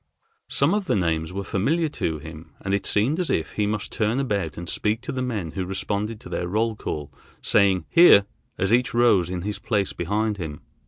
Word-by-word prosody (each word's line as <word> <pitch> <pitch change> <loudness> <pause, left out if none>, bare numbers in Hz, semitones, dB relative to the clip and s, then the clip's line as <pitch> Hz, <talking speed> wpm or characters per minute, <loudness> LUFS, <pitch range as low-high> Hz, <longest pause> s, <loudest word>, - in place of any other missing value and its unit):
Some - - +2
of 205 -1 0
the - - +1
names 80 -3 0
were 100 +2 -4
familiar 155 - 0
to 80 - -2
him, 80 +1 -11
and 95 - -2
it 100 - 0
seemed 125 - +2
as 180 - -1
if 80 - 0
he 105 -1 0
must 105 -1 -3
turn 110 +4 0
about 100 - -2
and 85 +1 -6
speak 110 +6 -1
to 125 - -5
the 130 - -3
men 105 -10 -3
who 95 - -3
responded 100 +3 -3
to - - -10
their 90 - -2
roll 110 +4 0
call, 75 -7 -5 0.3
saying 95 -4 +3
"here" 165 - +7 0.3
as 95 +3 +1
each 125 0 +2
rose 105 -8 +4
in 90 -1 -4
his 105 +1 -3
place 100 -4 -1
behind 105 +4 -1
him. 80 -5 -6
100 Hz, 210 wpm, -24 LUFS, 90-115 Hz, 0.3 s, here